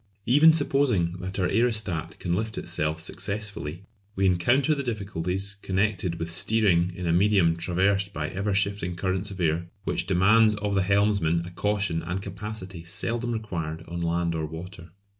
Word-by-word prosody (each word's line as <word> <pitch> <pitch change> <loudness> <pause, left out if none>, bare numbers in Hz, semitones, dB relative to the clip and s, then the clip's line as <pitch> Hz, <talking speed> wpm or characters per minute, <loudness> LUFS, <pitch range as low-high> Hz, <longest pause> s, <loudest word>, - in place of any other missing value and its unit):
Even 145 +7 +7
supposing 135 - +1
that 95 +1 -5
our 95 -2 +1
aerostat 105 -7 0
can 85 - -2
lift 110 +4 -2
itself 75 +1 -1
successfully, 95 -2 -3 0.3
we 95 - +1
encounter 120 - +3
the 140 - -2
difficulties 100 -4 -2
connected 95 -2 0
with 85 0 -3
steering 90 -2 +2
in 90 - -5
a 85 - +2
medium 95 -2 +4
traversed 95 +3 +1
by 75 -5 -3
ever 100 +2 -2
shifting 100 -3 0
currents 95 +2 -2
of 95 -1 -9
air, 85 0 0 0.2
which 85 - -2
demands 105 +4 +4
of 105 -1 -2
the 95 - +3
helmsman 100 -4 +2
a 90 - -8
caution 100 -2 -1
and 85 +3 -3
capacity 95 -3 -6
seldom 115 +7 -2
required 85 -8 -4
on 85 0 -5
land 85 0 0
or 80 -1 -2
water. 85 +2 -9
95 Hz, 160 wpm, -26 LUFS, 85-105 Hz, 0.3 s, Even